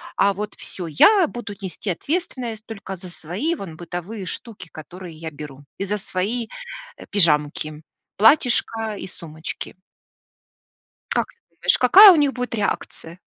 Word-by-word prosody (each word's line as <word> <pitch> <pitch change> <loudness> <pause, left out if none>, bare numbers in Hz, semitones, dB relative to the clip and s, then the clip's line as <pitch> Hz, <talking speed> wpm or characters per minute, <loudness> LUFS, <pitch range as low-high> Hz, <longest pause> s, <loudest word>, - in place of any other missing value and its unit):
а 200 - +4
вот 210 +2 -5
всё. 175 -3 -6
Я 365 - +5
буду 240 -6 -7
нести 190 +2 -5
ответственность 255 - -3
только 200 -3 -7
за 180 0 -10
свои, 185 - -3
вон, 185 - -8
бытовые 180 +4 -6
штуки, 200 -3 -7
которые 170 +2 -10
я 160 0 -6
беру, 145 -1 -10 0.2
и - - 0
за 210 +2 -1
свои, 210 +5 -2 0.5
э, - - -11
пижамки, 155 -4 +1 0.4
платьишко 225 -2 +3
и - - -7
сумочки. 160 -2 -8 1.4
Как - - +1
ты - - -33 0.2
думаешь, - - +2
какая 385 - +10
у - - +5
них 290 -3 +2
будет 250 -2 -3
реакция? 185 -4 -4
200 Hz, 145 wpm, -22 LUFS, 170-235 Hz, 1.4 s, какая